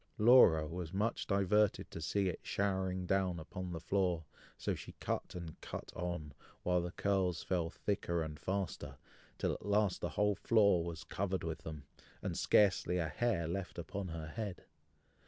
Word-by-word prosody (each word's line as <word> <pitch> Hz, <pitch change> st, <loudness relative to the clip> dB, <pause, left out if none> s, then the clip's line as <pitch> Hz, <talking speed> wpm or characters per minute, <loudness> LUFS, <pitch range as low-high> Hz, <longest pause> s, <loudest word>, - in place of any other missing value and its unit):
Laura 105 Hz, -9 st, +7 dB
was 85 Hz, +1 st, -5 dB
much 110 Hz, +4 st, 0 dB
diverted 100 Hz, +1 st, +2 dB
to -, -, -6 dB
see 100 Hz, -2 st, +1 dB
it 90 Hz, -, -2 dB
showering 95 Hz, -2 st, -1 dB
down 95 Hz, -1 st, +1 dB
upon 90 Hz, +3 st, -6 dB
the 85 Hz, -, -4 dB
floor, 90 Hz, -1 st, 0 dB, 0.3 s
so -, -, -1 dB
she -, -, -8 dB
cut -, -, -3 dB
and 85 Hz, -3 st, -7 dB
cut -, -, -6 dB
on, 85 Hz, -5 st, -4 dB, 0.3 s
while 90 Hz, 0 st, +2 dB
the 90 Hz, -, -3 dB
curls 95 Hz, -4 st, 0 dB
fell 85 Hz, -3 st, 0 dB
thicker 85 Hz, -3 st, -1 dB
and 75 Hz, -1 st, -6 dB
faster, 95 Hz, -1 st, -3 dB, 0.4 s
till -, -, 0 dB
at -, -, -7 dB
last 100 Hz, -2 st, +2 dB
the -, -, -1 dB
whole 105 Hz, 0 st, +4 dB
floor 100 Hz, -3 st, +4 dB
was 85 Hz, -1 st, -5 dB
covered 95 Hz, -1 st, -2 dB
with 80 Hz, -1 st, -3 dB
them, 75 Hz, -2 st, -7 dB, 0.4 s
and -, -, -2 dB
scarcely 95 Hz, -3 st, +4 dB
a 80 Hz, -3 st, 0 dB
hair 100 Hz, -3 st, 0 dB
left 90 Hz, +2 st, -4 dB
upon 95 Hz, +3 st, -4 dB
her 80 Hz, -2 st, -5 dB
head. 105 Hz, -1 st, -5 dB
90 Hz, 170 wpm, -35 LUFS, 85-100 Hz, 0.4 s, Laura